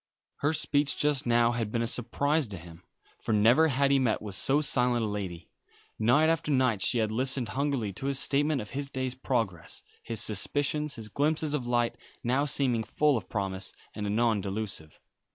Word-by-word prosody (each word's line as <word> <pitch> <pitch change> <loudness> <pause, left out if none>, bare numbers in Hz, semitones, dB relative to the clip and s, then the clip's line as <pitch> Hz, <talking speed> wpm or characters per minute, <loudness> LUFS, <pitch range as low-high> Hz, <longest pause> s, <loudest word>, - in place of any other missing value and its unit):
Her 145 - +1
speech 145 -2 +1
just 145 -2 +1
now 120 0 +3
had 115 -3 -3
been 115 0 0
a - - 0
surprise 140 +5 0
to 100 -2 -7
him, 85 0 -13 0.4
for - - -2
never 115 +10 +5
had 140 -1 +1
he 140 - +4
met 120 -5 +1
with 105 -2 -7
so 135 +8 +3
silent 125 -5 +3
a - - -2
lady. 95 -5 -5 0.5
Night 125 +8 +4
after 160 -1 0
night 130 -7 +2
she 120 - +3
had 110 -2 0
listened 130 0 0
hungrily 130 -4 -1
to 135 - -5
his 140 -1 +1
statement 145 +1 +1
of 105 - -9
his 140 0 -4
day's 130 -2 -3
progress, 115 -10 -3 0.2
his 115 -2 -4
suspicions, 145 +9 0
his 110 -2 -7
glimpses 150 +5 -1
of 130 -5 -2
light, 120 -1 0 0.3
now 130 +4 +1
seeming 130 -5 +1
full 150 +5 +1
of 110 -6 -5
promise, 95 -2 -3 0.2
and 105 -1 -4
anon 110 0 +1
delusive. 95 -6 -5
120 Hz, 190 wpm, -28 LUFS, 110-140 Hz, 0.5 s, never